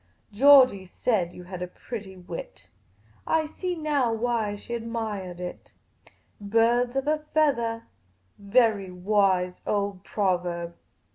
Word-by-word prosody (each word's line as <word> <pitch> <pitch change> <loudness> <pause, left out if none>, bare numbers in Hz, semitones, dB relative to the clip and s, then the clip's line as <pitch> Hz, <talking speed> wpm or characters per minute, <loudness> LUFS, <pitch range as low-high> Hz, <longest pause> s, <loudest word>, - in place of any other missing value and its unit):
Georgey 255 -4 +7
said 185 -1 -1
you 180 - -11
had 180 0 -8
a 180 - -3
pretty 195 0 -8
wit; - - -9 0.6
I 320 -1 +2
see 360 +4 -4
now 295 -7 0
why 225 -2 -1
she 220 +3 -8
admiahed 220 -6 -4
it. 180 0 -8 0.7
Birds 230 +4 +2
of 270 0 0
a 305 0 +2 0.2
feathah: 235 -7 +2 0.6
very 205 -2 +2
wise 180 -1 +1
old 200 -2 -1
proverb." 175 -4 -1
215 Hz, 120 wpm, -26 LUFS, 185-245 Hz, 0.7 s, Georgey